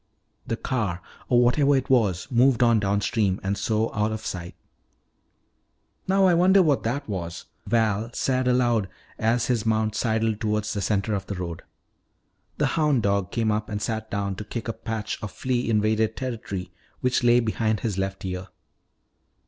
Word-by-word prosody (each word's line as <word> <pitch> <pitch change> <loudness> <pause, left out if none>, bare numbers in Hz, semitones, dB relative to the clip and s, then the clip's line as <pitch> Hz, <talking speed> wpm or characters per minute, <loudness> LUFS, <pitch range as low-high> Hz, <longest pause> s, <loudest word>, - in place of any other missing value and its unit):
The 115 - -2
car, 105 -11 -2 0.3
or 125 -1 +5
whatever 140 +3 +4
it 130 - 0
was, 105 -10 +2
moved 125 0 +4
on 115 -2 +4
downstream 100 0 0
and 100 +1 0
so 110 +2 0
out 105 +1 0
of 110 0 -5
sight. 85 -1 -5 1.5
"Now 195 +1 +4
I 180 - +5
wonder 185 +3 +5
what 145 -5 +2
that 140 +5 -2
was," 85 -5 -5 0.2
Val 110 -1 +1
said 130 -1 0
aloud 120 -5 +2 0.3
as 115 +2 +2
his 120 -4 0
mount 110 -1 +1
sidled 110 -1 0
toward 105 -1 0
the 105 -1 -3
center 105 +1 0
of 100 - -3
the 100 - -4
road. 85 -2 -5 1.0
The - - +2
hound 150 -7 +2
dog 100 -2 +1
came 115 -2 0
up 105 0 -2
and 105 -1 -3
sat 110 0 -3
down 100 -2 -2
to 105 - -5
kick 115 +2 -6
a 115 - -1
patch 110 -2 -4
of 105 -4 -5
flea 125 -2 -1
invaded 110 0 +1
territory 110 -8 -5 0.3
which 125 0 +1
lay 120 0 +5
behind 110 -2 0
his 105 -5 -2
left 95 0 -3
ear. 90 0 -4
110 Hz, 170 wpm, -25 LUFS, 100-120 Hz, 1.5 s, or